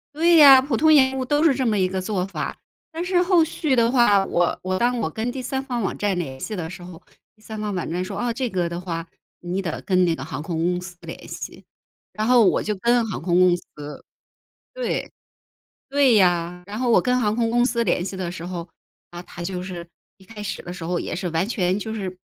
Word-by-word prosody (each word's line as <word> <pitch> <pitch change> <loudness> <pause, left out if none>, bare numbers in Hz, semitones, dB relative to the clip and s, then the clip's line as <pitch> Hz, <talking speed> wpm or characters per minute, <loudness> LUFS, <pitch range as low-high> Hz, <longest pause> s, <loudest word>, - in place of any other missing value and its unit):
对 335 +2 +4
呀， 275 -4 +9
普 265 -2 -2
通 315 +6 +5
延 265 -2 +4
误 260 - -1
都 290 +3 +1
是 310 -5 +4
这 260 - -1
么 215 -3 +1
一 185 - +3
个 190 0 -3
做 185 -1 -2
法， 195 - -5 0.3
但 330 +2 -4
是 360 0 +2
后 355 -2 +4
续 305 -3 -1
的 230 0 +4
话， 205 -6 +4
我 175 -2 0
我 185 0 -2
当 245 +3 +1
我 185 - -1
跟 220 +8 -3
第 260 +1 -5
三 265 +2 -3
方 245 -3 -3
网 195 - -2
站 205 -3 0
联 135 -6 -5
系 215 - -5
的 165 -4 -4
时 185 0 -10
候， 175 -2 -11 0.3
第 215 - -27
三 215 0 -8
方 210 -1 -3
网 180 -3 -3
站 175 +3 -2
说： 185 - -6
“啊， 240 -1 -1
这 250 +1 -2
个 180 -4 -1
的 170 +1 -5
话， 165 -2 -5 0.3
你 180 +2 -3
得 170 -5 -4
跟 185 -1 +2
那 170 -2 +2
个 - - -6
航 135 +3 -6
空 165 0 -4
公 180 0 0
司 180 -1 -10
联 - - -9
系。 - - -8 0.5
“然 215 +1 -2
后 245 -2 +6
我 - - +3
就 210 - -2
跟 235 +4 +2
航 195 - -5
空 175 +1 +2
公 180 -1 +5
司 175 - -9 1.1
对， - - -3 0.8
对 275 -3 +4
呀。 180 -2 +2
然 205 +3 -6
后 250 -1 0
我 230 - +6
跟 250 0 +1
航 210 -2 +1
空 230 -1 0
公 240 +1 +3
司 235 -2 +1
联 175 -4 0
系 190 +1 -5
的 180 -2 -3
时 175 -2 -8
候， 175 -1 -5 0.4
啊， 175 0 -7
他 175 -1 -9
就 180 0 -4
是 180 -2 -7 0.3
一 190 - -19
开 210 +1 -10
始 210 - -5
的 175 - -7
时 180 -2 -8
候 175 +1 -1
也 - - -4
是 180 0 -3
完 165 +3 0
全 185 -5 0
就 220 +1 -5
是 190 -4 -5
200 Hz, 265 characters per minute, -23 LUFS, 180-245 Hz, 1.1 s, 呀